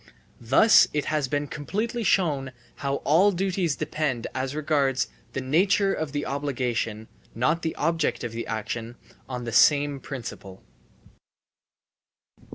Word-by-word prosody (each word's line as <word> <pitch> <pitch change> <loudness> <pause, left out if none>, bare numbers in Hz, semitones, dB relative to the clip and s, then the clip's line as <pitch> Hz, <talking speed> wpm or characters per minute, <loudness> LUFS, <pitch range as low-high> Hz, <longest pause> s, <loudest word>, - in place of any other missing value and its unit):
Thus 135 - +6
it 150 -1 -1
has 150 -3 +1
been 145 +2 -1
completely 215 - -3
shown 145 -10 +1 0.2
how 140 0 -2
all 180 +7 +5
duties 185 -4 0
depend 150 -6 -2
as 130 +2 -3
regards 145 -4 +1 0.2
the 135 - -2
nature 195 +8 +2
of 155 -2 -3
the 145 0 -2
obligation 125 -6 -2 0.3
(not 155 +8 +1
the 160 - -3
object 165 +1 0
of 120 - -3
the 115 +1 -5
action) 115 +1 -4 0.3
on 125 -1 -4
the 115 - -4
same 145 +3 +4
principle. 115 -9 -8
145 Hz, 130 wpm, -25 LUFS, 125-160 Hz, 0.3 s, Thus